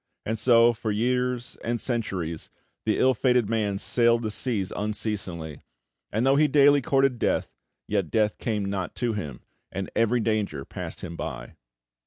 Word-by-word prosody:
And 110 0 -2
so, 115 0 +5
for 110 0 -4
years 125 +2 -1
and 120 0 -1
centuries, 95 -10 -3 0.4
the 110 - +1
ill 130 0 +4
fated 125 -2 +2
man 105 -3 0
sailed 120 +2 +2
the 110 - -2
seas 105 -5 -1
unceasingly, 100 -7 -3 0.5
and 110 +4 0
though 135 +1 +4
he 150 +1 +5
daily 145 0 +5
courted 135 -2 +2
death, - - 0 0.3
yet 100 -6 0
death 105 -2 +1
came 105 -4 -1
not 100 -2 -3
to 120 -2 -1
him, 75 - -5 0.3
and 95 0 -4
every 115 +2 +2
danger 105 -11 -1
passed - - -6
him 85 - -6
by. - - -6
110 Hz, 160 wpm, -26 LUFS, 100-125 Hz, 0.5 s, so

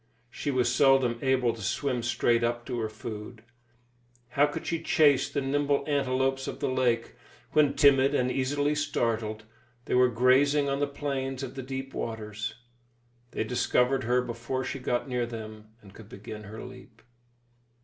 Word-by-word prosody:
She 145 - -4
was 130 -3 +1
seldom 135 -4 +4
able 130 -3 +2
to 110 - -10
swim 125 +5 -1
straight 120 0 +1
up 120 0 -1
to 125 -3 -3
her 110 -1 -2
food. 110 +1 -8 0.9
How 140 +4 +3
could 145 - -6
she 165 -1 -2
chase 145 -3 +3
the 140 - -2
nimble 140 +1 +1
antelopes 135 -2 0
of - - -5
the - - -1
lake 125 -3 0 0.4
when, 150 -2 +3
timid 140 0 +5
and 125 -1 +1
easily 145 +3 0
startled, 115 -7 -1 0.4
they - - -3
were 125 0 +5
grazing 135 +5 +3
on 140 0 -1
the 145 - +1
plains 135 -2 -3
of 130 -1 -6
the 135 - -6
deep 135 +1 -6
waters; 110 -1 -4 0.7
they - - -2
discovered 125 +1 +1
her 125 +1 +2
before 120 +2 -4
she 135 - -4
got 125 +1 -1
near 125 -2 -1
them 110 -2 -8 0.2
and 95 -2 -15
could 110 -1 -13
begin 105 -3 -9
her 110 +2 -8
leap! 125 -2 -13
125 Hz, 165 wpm, -28 LUFS, 115-135 Hz, 0.9 s, timid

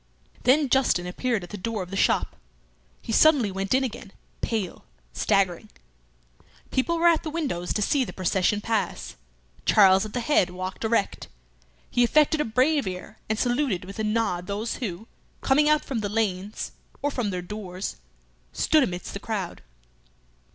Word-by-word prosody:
Then 280 +4 +5
Justin 250 -9 +2
appeared 220 +3 -1
at 175 - -10
the 210 - -5
door 215 0 -2
of 180 - -12
the - - -4
shop. - - +1 0.7
He 230 - -5
suddenly 275 -7 +5
went 195 +1 -4
in 265 - +2
again, 215 -5 -6 0.3
pale, 215 -6 -3 0.3
staggering. 185 -4 +1 1.0
People 335 +6 +1
were 340 +1 +4
at 335 -2 +4
the 320 - -5
windows 280 - -3
to 210 - 0
see 275 +5 +2
the - - -6
procession 190 +3 0
pass. 225 -1 -2 0.5
Charles 195 -2 +6
at 215 -1 -7
the 250 - -1
head 230 -8 +3
walked 185 +3 -6
erect. 220 -2 0 0.6
He 245 - +3
affected 300 +5 +3
a - - 0
brave 260 +3 +2
air, 180 -1 -7
and 215 - 0
saluted 245 -6 0
with 195 +3 -9
a - - 0
nod 210 -5 0
those 210 +3 -3
who, 215 -2 -5 0.3
coming 295 +3 +3
out 305 0 +3
from 260 -5 -2
the 205 -1 -2
lanes 205 -2 -2 0.3
or 290 - +1
from 245 -6 -1
their 180 -2 -3
doors, 185 - -6 0.5
stood 310 - +3
amidst 180 -8 -3
the 200 - -5
crowd. 200 -5 -4
215 Hz, 165 wpm, -25 LUFS, 190-260 Hz, 1.0 s, Charles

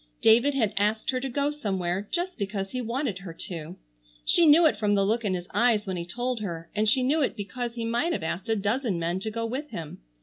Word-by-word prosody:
David 240 +6 +5
had 220 -6 +1
asked 210 +4 +1
her 255 - -1
to 270 +1 -3
go 280 +3 0
somewhere 195 -8 -2
just 355 -3 -2
because 195 -1 -3
he 255 - -2
wanted 240 -3 -2
her 190 -4 -8
to. 165 0 -7 0.5
She 340 -2 +5
knew 320 +3 +7
it 310 - +4
from 205 -1 +1
the 195 -1 +3
look 225 +3 +1
in 195 -3 0
his 175 0 -5
eyes 230 -3 +3
when 190 -2 -3
he 170 -1 -4
told 245 +5 -2
her, 170 -5 -5
and 215 +1 +2
she 255 +3 +3
knew 295 +5 +2
it 270 - 0
because 235 +4 -4
he 230 -1 -3
might 240 +9 0
have 190 - -2
asked 185 +7 -3
a 225 - +3
dozen 215 0 0
men 170 +2 -1
to 220 - -3
go 230 +1 -3
with 265 +6 -4
him. 165 -8 -7
220 Hz, 245 wpm, -27 LUFS, 195-255 Hz, 0.5 s, knew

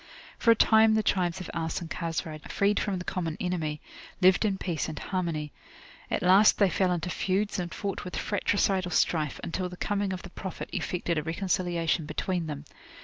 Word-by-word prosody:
For 230 - +2
a 230 - +8
time 220 0 +5
the 220 - +2
tribes 185 -2 +1
of 185 - -7
Aus 165 -1 -2
and 170 - -6
Khazraj, 160 -2 -4
freed 200 +1 +2
from 200 -3 -1
the 180 - -6
common 165 -4 -2
enemy, 160 -5 -2 0.4
lived 185 +3 +5
in 200 -2 +1
peace 170 -4 -2
and 155 - -6
harmony. 165 -6 -2 0.6
At - - -1
last 190 +4 +6
they 200 -3 +4
fell 185 -2 +2
into 175 0 -1
feuds 200 +3 0
and 175 -1 -3
fought 200 -2 -4
with 180 - -6
fratricidal 195 -2 +1
strife, 155 -4 +1
until 180 +2 -2
the 180 - -10
coming 205 0 -1
of 185 -1 -5
the 175 - -10
Prophet 190 -1 -6
effected 175 -2 -1
a - - -2
reconciliation 170 -1 -1
between 180 -1 -2
them. 150 -1 -6
180 Hz, 190 wpm, -28 LUFS, 165-195 Hz, 0.6 s, a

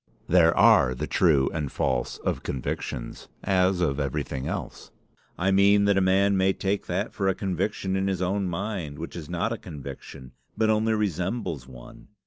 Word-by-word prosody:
"There 85 -1 +4
are 65 - +5
the - - -3
true 75 -7 +3
and 75 -4 -3
false 60 -2 -1
of - - -2
convictions, 60 -1 -5 0.2
as 95 -1 +2
of 70 -5 0
everything 65 -1 -3
else. - - -5 0.5
I 95 +2 +1
mean 100 +1 +5
that 100 0 +3
a 95 - +3
man 95 +2 +3
may 95 0 +3
take 100 +1 -2
that 95 +5 -2
for 95 - -1
a 95 - +2
conviction 95 0 -2
in 95 0 0
his 95 -2 -1
own 95 +2 0
mind 90 -4 -4
which 85 - -7
is 80 -4 -7
not 90 +7 -1
a 115 - -6
conviction, 70 -4 -9 0.3
but 110 0 +3
only 110 +1 +2
resembles 90 - -2
one. 60 -2 -13
95 Hz, 175 wpm, -26 LUFS, 75-100 Hz, 0.5 s, are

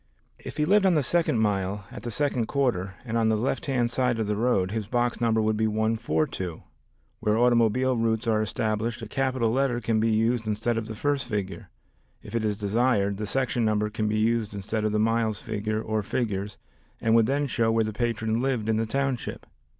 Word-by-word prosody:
If - - -9
he 150 - +2
lived 195 +3 +4
on 180 - +4
the 150 - +2
second 165 -2 +1
mile 100 -1 -1
at - - -8
the 120 - -5
second 125 -1 0
quarter, 100 -9 0
and 115 -1 -2
on 110 -1 +3
the 110 - +2
left 130 +6 -2
hand 120 -3 +1
side 125 -1 +1
of 110 - 0
the 105 0 -1
road, 105 -5 +1
his 110 -2 -3
box 120 +1 0
number 110 -1 +2
would 110 0 +1
be 110 0 +2
142. 110 - -1 0.6
Where 105 -1 +1
automobile 120 +2 +3
routes 115 0 0
are 110 -2 +2
established 110 +3 -2
a - - -5
capital 130 -1 0
letter 130 -1 +1
can 115 -1 0
be 115 +1 +2
used 115 +1 +1
instead 110 +3 0
of 115 -1 -3
the 110 - -6
first 140 +2 -1
figure. 100 -3 -4 0.5
If 105 - -11
it 115 -1 0
is 105 -2 0
desired, 100 -1 +1
the 105 0 -3
section 125 +1 0
number 105 -1 +1
can 110 0 -1
be 105 0 0
used 110 -1 0
instead 105 +2 -2
of 110 - +1
the 105 - +1
miles 110 -1 +1
figure 110 -1 -2
or 110 -1 -1
figures, 105 -2 -2 0.4
and 110 - +1
would 115 -1 +5
then 140 +2 +1
show 115 -4 +1
where 115 0 +2
the 110 0 -3
patron 110 0 -1
lived 125 -5 -1
in 110 - +2
the 115 0 0
township. 135 0 -2
110 Hz, 210 wpm, -26 LUFS, 105-120 Hz, 0.6 s, would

